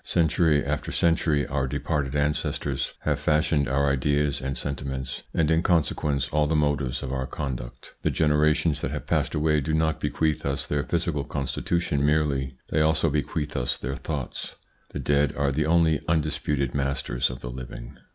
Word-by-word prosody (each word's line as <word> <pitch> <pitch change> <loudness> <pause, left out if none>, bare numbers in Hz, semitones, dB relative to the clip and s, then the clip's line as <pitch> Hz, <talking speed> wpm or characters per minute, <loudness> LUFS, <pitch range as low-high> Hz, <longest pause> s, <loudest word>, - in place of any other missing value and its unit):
Century 80 -3 +2
after 75 +1 -2
century 80 -3 +2
our 65 -1 -1
departed 70 +1 -2
ancestors 75 +1 -1
have 75 -2 0
fashioned 75 -2 +2
our 70 +2 +2
ideas 70 +1 +1
and 65 0 -3
sentiments, 65 -3 -4
and 80 -1 +1
in 80 0 +3
consequence 75 -5 +1
all 75 0 +2
the 80 - +1
motives 75 -4 0
of 65 - -4
our 65 -1 -2
conduct. 60 -3 -6
The - - +1
generations 75 0 +2
that - - -1
have - - -5
passed - - 0
away 75 0 +2
do 80 +3 -2
not 80 0 +1
bequeath 75 0 0
us 70 0 -1
their 75 -1 0
physical 85 -4 -1
constitution 75 +2 -1
merely; 70 -3 +1
they 75 - +2
also 80 0 +3
bequeath 75 +1 -2
us 60 - 0
their 65 +2 -4
thoughts. - - -5 0.3
The - - -6
dead 70 -1 +1
are 70 -1 +1
the 75 +2 0
only 80 -2 +3
undisputed 75 -4 0
masters 70 -3 0
of 60 - -7
the 60 - -5
living. - - -8
75 Hz, 170 wpm, -26 LUFS, 70-75 Hz, 0.3 s, in